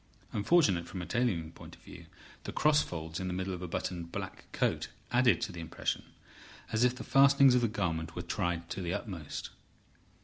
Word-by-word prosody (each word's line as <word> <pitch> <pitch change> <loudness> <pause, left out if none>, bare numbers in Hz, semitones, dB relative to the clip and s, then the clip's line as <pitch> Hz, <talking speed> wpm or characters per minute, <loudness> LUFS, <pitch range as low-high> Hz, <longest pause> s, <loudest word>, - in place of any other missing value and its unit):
Unfortunate 100 - +3
from 90 -1 -5
a - - -5
tailoring 85 -5 0
point - - -12
of - - -24
view, - - -12 0.4
the - - -3
cross 150 0 +4
folds 80 -1 -5
in 95 - -3
the 90 - -2
middle 95 +1 -2
of 90 - -6
a 90 - -4
buttoned 85 0 -4
black - - -7
coat - - 0 0.2
added 125 0 +4
to 105 - -2
the 85 - -8
impression, 80 - -3 0.7
as 110 +1 +2
if 125 0 +3
the - - -7
fastenings 140 -1 +6
of 125 - +4
the 120 - +3
garment 85 -6 -2
were 90 - -4
tried 85 -2 -2
to 95 - -3
the 90 0 -1
utmost. 85 -9 -6
95 Hz, 200 wpm, -31 LUFS, 85-120 Hz, 0.7 s, fastenings